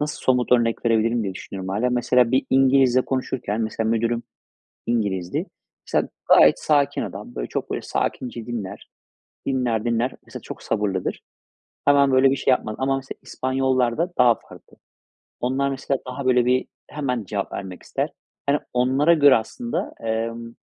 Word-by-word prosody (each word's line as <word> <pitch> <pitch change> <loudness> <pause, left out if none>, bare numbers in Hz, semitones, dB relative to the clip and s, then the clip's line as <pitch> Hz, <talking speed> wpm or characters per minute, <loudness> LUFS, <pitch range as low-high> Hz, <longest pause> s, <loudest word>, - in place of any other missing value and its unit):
Nasıl 150 0 -3
somut 125 -1 +2
örnek 120 -1 +2
verebilirim 115 +1 +2
diye 95 -2 -3
düşünüyorum, 95 0 -7
hâlâ. 110 +6 0
Mesela, 125 -1 +3
bir 130 - +2
İngilizle 130 -1 +4
konuşurken, 125 -4 -2
mesela, 110 0 -1
müdürüm 115 +1 0 0.6
İngiliz'di. 100 -6 -1 0.4
Mesela, - - 0 0.2
gayet - - +7
sakin 145 -2 +2
adam. - - -7
Böyle - - -3
çok - - -4
böyle - - -2
sakince 120 -3 -3
dinler. 105 -5 -6 0.6
Dinler 120 -4 0
dinler. 120 +2 +1
Mesela, - - -9
çok - - -9
sabırlıdır. 95 -3 -2 0.6
Hemen 140 -1 +5
böyle 130 +1 +5
bir - - +2
şey 130 - +1
yapmaz. 110 -4 0
Ama, 135 +1 +1
mesela, 135 0 -6
İspanyollar'da 130 +4 0
daha 120 -2 +6
farklı. - - -16 0.6
Onlar, 135 +3 0
mesela, 135 0 -2
daha 130 +2 -5
böyle 125 -1 +4
bir 125 +1 +2 0.2
hemen 125 -7 -2
cevap 100 +1 -4
vermek 95 -2 -7
ister. - - -2 0.4
Yani, 145 +1 +3
onlara 130 +6 +3
göre, 145 -5 +6
aslında, 235 - -3
emm, 115 +1 -3
125 Hz, 150 wpm, -23 LUFS, 115-135 Hz, 0.6 s, gayet